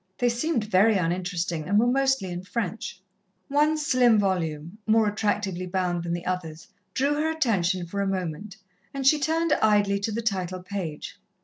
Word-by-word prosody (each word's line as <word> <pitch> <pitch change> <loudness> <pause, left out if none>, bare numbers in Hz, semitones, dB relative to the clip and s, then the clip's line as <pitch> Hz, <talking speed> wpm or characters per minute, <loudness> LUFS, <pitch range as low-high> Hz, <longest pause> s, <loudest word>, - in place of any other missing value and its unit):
They 245 - +2
seemed 240 +1 0
very 210 +1 +4
uninteresting, 175 -2 -2
and 205 - +3
were 225 - +4
mostly 265 -6 +1
in 175 0 -4
French. 220 +1 -4 0.5
One 300 +2 +3
slim 255 -6 +4
volume, 175 -2 -1
more 220 0 +4
attractively 205 -3 -1
bound 180 -1 -1
than 170 0 -2
the 175 0 -4
others, 165 -3 -4 0.3
drew 280 +2 +2
her 305 +2 0
attention 195 - 0
for 200 +4 -3
a 200 - 0
moment, 190 +1 -4 0.4
and 270 -1 -3
she 300 +3 +5
turned 320 +1 +1
idly 205 -2 +3
to 200 +2 -2
the 230 +2 -3
title 185 -4 -2
page. 180 -6 -6
200 Hz, 170 wpm, -26 LUFS, 180-240 Hz, 0.5 s, she